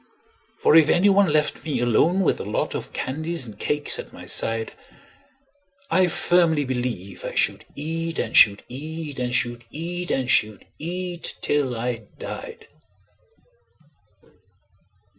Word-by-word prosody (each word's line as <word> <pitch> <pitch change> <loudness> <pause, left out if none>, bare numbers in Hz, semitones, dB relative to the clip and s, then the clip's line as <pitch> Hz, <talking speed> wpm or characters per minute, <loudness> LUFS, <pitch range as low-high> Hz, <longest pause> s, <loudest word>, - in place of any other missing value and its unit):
For - - +5
if 160 -2 +7
any 190 +4 +5
one 195 -4 +4
left 150 0 +1
me 145 -6 -2
alone 120 - +3
with 185 - +1
a - - -4
lot 105 +2 -2
Of - - -5
candies 155 +2 -3
and 105 -3 -11
cakes 145 0 +1
at - - -8
my - - -11
side, 115 0 0 1.2
I 185 -1 +4
firmly 165 -3 +2
believe 120 -8 -4
I - - -5
should - - +1
eat, 165 +2 -4
and - - -2
should 100 -2 +6
eat, 150 +2 -6
And 125 -1 -1
should 120 -1 -1
eat, 175 +5 -5
and 130 -2 0
should 105 -5 +2
eat, 175 +1 -4
till 140 -4 +1
I 115 -2 -3
died. 460 -2 -8
150 Hz, 140 wpm, -23 LUFS, 120-170 Hz, 1.2 s, if